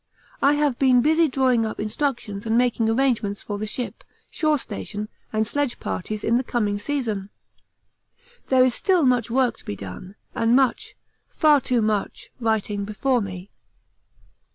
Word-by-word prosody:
I 280 Hz, -, +5 dB
have 290 Hz, -4 st, 0 dB
been 255 Hz, -3 st, +4 dB
busy 320 Hz, +2 st, +4 dB
drawing 255 Hz, -4 st, +2 dB
up 220 Hz, -, -4 dB
instructions 220 Hz, -2 st, -3 dB
and 225 Hz, +1 st, +2 dB
making 240 Hz, -2 st, +2 dB
arrangements 225 Hz, -4 st, 0 dB
for 205 Hz, -1 st, -5 dB
the 215 Hz, -, -3 dB
ship, 245 Hz, +3 st, -5 dB, 0.3 s
shore 310 Hz, -2 st, +1 dB
station, 210 Hz, -3 st, -5 dB, 0.2 s
and 220 Hz, 0 st, +1 dB
sledge 285 Hz, +2 st, -2 dB
parties 210 Hz, +3 st, -4 dB
in 230 Hz, +1 st, +2 dB
the 255 Hz, -, 0 dB
coming 210 Hz, -5 st, -1 dB
season. 220 Hz, -6 st, -2 dB, 1.2 s
There 260 Hz, -1 st, +5 dB
is 255 Hz, -, +2 dB
still 365 Hz, +2 st, +2 dB
much 245 Hz, -3 st, +2 dB
work 245 Hz, -2 st, +1 dB
to -, -, -16 dB
be 105 Hz, -, -5 dB
done 100 Hz, -, -9 dB, 0.2 s
and 230 Hz, +1 st, +2 dB
much, 265 Hz, -2 st, +1 dB, 0.3 s
far 300 Hz, -3 st, +4 dB
too 245 Hz, -3 st, +1 dB
much, 210 Hz, -2 st, -2 dB
writing 215 Hz, -3 st, -1 dB
before 240 Hz, +5 st, 0 dB
me. 185 Hz, -1 st, -7 dB
235 Hz, 155 wpm, -23 LUFS, 210-265 Hz, 1.2 s, I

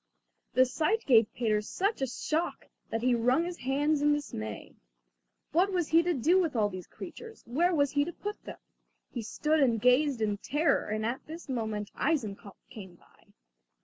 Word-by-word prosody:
The 255 Hz, -, +5 dB
sight 325 Hz, -, 0 dB
gave 230 Hz, -5 st, +5 dB
Peter 215 Hz, -3 st, 0 dB
such 390 Hz, -, -2 dB
a 270 Hz, -, +1 dB
shock 310 Hz, +6 st, -2 dB, 0.2 s
that 225 Hz, +1 st, -3 dB
he 250 Hz, 0 st, +3 dB
wrung 250 Hz, +7 st, +2 dB
his 350 Hz, 0 st, -6 dB
hands 285 Hz, +3 st, +1 dB
in 295 Hz, 0 st, +4 dB
dismay. 110 Hz, -, -5 dB, 0.8 s
What 365 Hz, +6 st, +3 dB
was 355 Hz, -4 st, -1 dB
he 330 Hz, +1 st, +6 dB
to 345 Hz, 0 st, 0 dB
do 335 Hz, +9 st, +3 dB
with 325 Hz, -6 st, -2 dB
all 210 Hz, -2 st, +2 dB
these 185 Hz, -2 st, -8 dB
creatures, 450 Hz, -1 st, -10 dB
where 340 Hz, +9 st, +1 dB
was 285 Hz, -2 st, +2 dB
he 285 Hz, 0 st, +2 dB
to 345 Hz, -, -5 dB
put 415 Hz, +4 st, -7 dB
them? -, -, -8 dB, 0.5 s
He 240 Hz, -, -4 dB
stood 305 Hz, +8 st, 0 dB
and 240 Hz, -5 st, +3 dB
gazed 250 Hz, +3 st, +3 dB
in 210 Hz, -2 st, -1 dB
terror, 295 Hz, +4 st, +1 dB
and 215 Hz, +1 st, -2 dB
at 240 Hz, +3 st, -3 dB
this 325 Hz, +2 st, -9 dB
moment 220 Hz, -5 st, -3 dB
Eisenkopf 215 Hz, -9 st, -2 dB
came 190 Hz, -5 st, -10 dB
by. -, -, -26 dB
270 Hz, 180 wpm, -29 LUFS, 225-320 Hz, 0.8 s, he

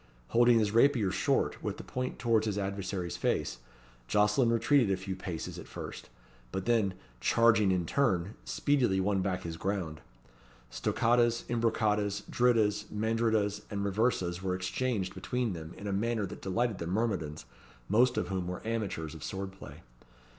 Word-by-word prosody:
Holding 120 Hz, 0 st, +5 dB
his 105 Hz, -2 st, +2 dB
rapier 115 Hz, -4 st, +4 dB
short, 95 Hz, -, 0 dB
with -, -, -3 dB
the -, -, -8 dB
point 130 Hz, 0 st, -4 dB
towards 110 Hz, 0 st, +2 dB
his 105 Hz, -1 st, -1 dB
adversary's 95 Hz, -3 st, -3 dB
face, -, -, -1 dB, 0.5 s
Jocelyn 105 Hz, -, +3 dB
retreated 115 Hz, +1 st, +3 dB
a 95 Hz, -, +1 dB
few 95 Hz, 0 st, -5 dB
paces 90 Hz, -3 st, -5 dB
at -, -, -10 dB
first, -, -, -8 dB, 0.4 s
but 95 Hz, 0 st, -3 dB
then, 110 Hz, -6 st, +2 dB, 0.2 s
charging 110 Hz, -, +4 dB
in 90 Hz, -2 st, +1 dB
turn, 100 Hz, -6 st, +1 dB
speedily 95 Hz, -, +1 dB
won 95 Hz, 0 st, +1 dB
back 90 Hz, -1 st, -2 dB
his 80 Hz, -1 st, -5 dB
ground. 90 Hz, -6 st, -3 dB, 0.7 s
Stoccatas, 120 Hz, -, +2 dB
imbroccatas, 105 Hz, -3 st, +1 dB
drittas, 110 Hz, -4 st, +3 dB
mandrittas, 110 Hz, -1 st, 0 dB
and 100 Hz, -1 st, -2 dB
riversas 95 Hz, -4 st, 0 dB
were 95 Hz, -1 st, -1 dB
exchanged 95 Hz, +1 st, -2 dB
between 125 Hz, -4 st, -2 dB
them 80 Hz, -1 st, -8 dB
in 100 Hz, -, -9 dB
a 100 Hz, -, -1 dB
manner 110 Hz, +1 st, 0 dB
that 90 Hz, -, -8 dB
delighted 110 Hz, +2 st, -1 dB
the 85 Hz, -, -4 dB
myrmidons, 90 Hz, -, -1 dB, 0.4 s
most 120 Hz, +5 st, +3 dB
of 90 Hz, -, -1 dB
whom 95 Hz, -2 st, -2 dB
were 90 Hz, +3 st, -5 dB
amateurs 100 Hz, -9 st, -2 dB
of 80 Hz, -2 st, -9 dB
sword 95 Hz, 0 st, -4 dB
play. 95 Hz, -, -12 dB
105 Hz, 155 wpm, -31 LUFS, 95-115 Hz, 0.7 s, Holding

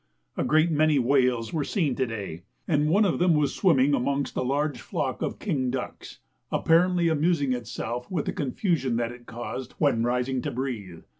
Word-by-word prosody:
A -, -, -1 dB
great 155 Hz, +2 st, +3 dB
many 155 Hz, -1 st, +3 dB
whales 125 Hz, -2 st, +2 dB
were 155 Hz, -3 st, 0 dB
seen 155 Hz, -, 0 dB
to 130 Hz, 0 st, -1 dB
day, 100 Hz, -7 st, -6 dB, 0.3 s
and 150 Hz, -1 st, +2 dB
one 205 Hz, +6 st, +4 dB
of 185 Hz, -, 0 dB
them 175 Hz, -2 st, +4 dB
was 150 Hz, -2 st, +1 dB
swimming 145 Hz, -7 st, +3 dB
amongst 140 Hz, +2 st, 0 dB
a -, -, 0 dB
large 140 Hz, 0 st, -1 dB
flock -, -, -3 dB
of -, -, -2 dB
king 130 Hz, -3 st, -1 dB
ducks, 125 Hz, 0 st, -5 dB, 0.3 s
apparently 175 Hz, +1 st, +3 dB
amusing 155 Hz, -3 st, +2 dB
itself 120 Hz, 0 st, -5 dB
with 170 Hz, -6 st, -2 dB
the -, -, -2 dB
confusion 135 Hz, -, -1 dB
that 115 Hz, 0 st, -1 dB
it 120 Hz, 0 st, -13 dB
caused 120 Hz, +2 st, -6 dB
when 140 Hz, -7 st, +1 dB
rising 125 Hz, +2 st, 0 dB
to -, -, -3 dB
breathe. 115 Hz, -10 st, -5 dB
135 Hz, 180 wpm, -26 LUFS, 125-155 Hz, 0.3 s, one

